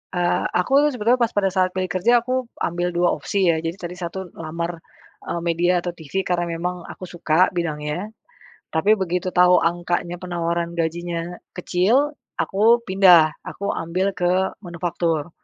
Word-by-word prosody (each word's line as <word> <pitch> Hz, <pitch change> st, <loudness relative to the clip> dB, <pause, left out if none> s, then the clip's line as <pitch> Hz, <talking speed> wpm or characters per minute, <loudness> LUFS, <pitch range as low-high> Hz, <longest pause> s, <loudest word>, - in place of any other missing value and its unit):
Eee, 175 Hz, 0 st, +1 dB, 0.2 s
aku 180 Hz, -, -2 dB
tuh 300 Hz, -, +4 dB
sebenernya 245 Hz, 0 st, +1 dB
pas 230 Hz, -, 0 dB
pada 200 Hz, -1 st, +1 dB
saat 185 Hz, -1 st, +3 dB
pilih 185 Hz, 0 st, -2 dB
kerja 235 Hz, +7 st, +4 dB
aku 240 Hz, +2 st, -6 dB, 0.4 s
ambil 175 Hz, +1 st, -2 dB
2 175 Hz, 0 st, +2 dB
opsi 195 Hz, -2 st, 0 dB
ya 165 Hz, -, +4 dB
jadi 165 Hz, +3 st, -3 dB
tadi 175 Hz, -1 st, -6 dB
satu 180 Hz, +1 st, -5 dB, 0.2 s
lamar, 170 Hz, +2 st, -3 dB, 0.5 s
eee, 170 Hz, -, -3 dB
media 175 Hz, +2 st, +2 dB
atau 175 Hz, 0 st, -4 dB
TV 160 Hz, -4 st, -14 dB
karena 175 Hz, -1 st, +1 dB
memang 180 Hz, +1 st, -4 dB
aku 185 Hz, -, -9 dB
suka 175 Hz, 0 st, +2 dB
bidangnya. 160 Hz, +3 st, -3 dB, 0.6 s
Tapi 160 Hz, +6 st, +2 dB
begitu 180 Hz, -1 st, -1 dB
tau 180 Hz, 0 st, +5 dB
angkanya 175 Hz, +1 st, -1 dB
penawaran 170 Hz, -1 st, -2 dB
gajinya 170 Hz, +1 st, -3 dB, 0.2 s
kecil, 200 Hz, +11 st, +2 dB, 0.2 s
aku 225 Hz, +4 st, +3 dB
pindah, 185 Hz, -6 st, +6 dB, 0.2 s
aku 200 Hz, -, -7 dB
ambil 180 Hz, +4 st, -1 dB
ke 175 Hz, -, +1 dB, 0.3 s
manufaktur. 170 Hz, -3 st, -2 dB
175 Hz, 155 wpm, -22 LUFS, 170-185 Hz, 0.6 s, pindah